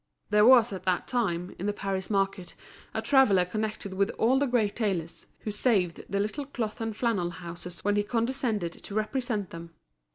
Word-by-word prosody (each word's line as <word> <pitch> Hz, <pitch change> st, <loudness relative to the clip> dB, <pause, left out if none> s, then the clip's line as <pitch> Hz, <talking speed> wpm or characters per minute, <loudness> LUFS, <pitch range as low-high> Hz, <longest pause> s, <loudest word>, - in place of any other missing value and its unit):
There 210 Hz, +1 st, +6 dB
was 240 Hz, -4 st, +7 dB
at 185 Hz, -, -5 dB
that 185 Hz, -2 st, +1 dB
time, 185 Hz, -8 st, -1 dB
in 195 Hz, -, -2 dB
the 205 Hz, -, +1 dB
Paris 195 Hz, -2 st, -3 dB
market, 195 Hz, -3 st, -1 dB, 0.4 s
a -, -, -3 dB
traveller 215 Hz, -10 st, +5 dB
connected 215 Hz, 0 st, -3 dB
with 200 Hz, +2 st, +1 dB
all 255 Hz, +4 st, +3 dB
the 285 Hz, -, +2 dB
great 225 Hz, -5 st, +1 dB
tailors, 185 Hz, -7 st, -2 dB
who 215 Hz, -, -3 dB
saved 205 Hz, -5 st, +1 dB
the 200 Hz, -, 0 dB
little 235 Hz, +8 st, -2 dB
cloth 230 Hz, -6 st, -4 dB
and 225 Hz, -1 st, -2 dB
flannel 210 Hz, -8 st, 0 dB
houses 175 Hz, 0 st, -8 dB
when 205 Hz, 0 st, +2 dB
he -, -, +4 dB
condescended 230 Hz, -4 st, -1 dB
to 200 Hz, -, -9 dB
represent 215 Hz, -2 st, -1 dB
them. 165 Hz, 0 st, -9 dB
205 Hz, 185 wpm, -28 LUFS, 185-230 Hz, 0.4 s, was